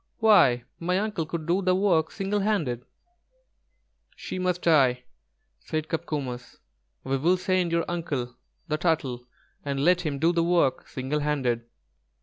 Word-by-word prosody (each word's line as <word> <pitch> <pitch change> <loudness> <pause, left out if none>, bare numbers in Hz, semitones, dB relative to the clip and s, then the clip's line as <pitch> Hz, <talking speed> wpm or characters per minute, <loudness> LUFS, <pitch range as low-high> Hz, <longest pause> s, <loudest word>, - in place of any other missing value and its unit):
Why, 175 - +5 0.2
my 180 +2 0
uncle 205 -6 -2
could 160 -1 -4
do 175 +4 +1
the 185 -1 +2
work 180 -5 +2
single 195 +1 -2
handed." 165 - -1 1.3
"She 185 - -6
must 180 -1 -1
die," 130 -7 +4 0.6
said 155 - -4
Copcomus; 140 -7 -4 0.5
"we 135 +1 -1
will 170 +7 +2
send 185 -1 0
your 170 0 +1
uncle, 145 -8 -3 0.3
the 155 -2 -1
Turtle, 135 -8 -1 0.4
and 140 0 -1
let 180 0 +4
him 150 -5 -2
do 165 +5 +2
the 170 -1 +2
work 170 -6 +1
single 135 +3 -3
handed." 130 -6 -1
160 Hz, 140 wpm, -26 LUFS, 135-180 Hz, 1.3 s, Why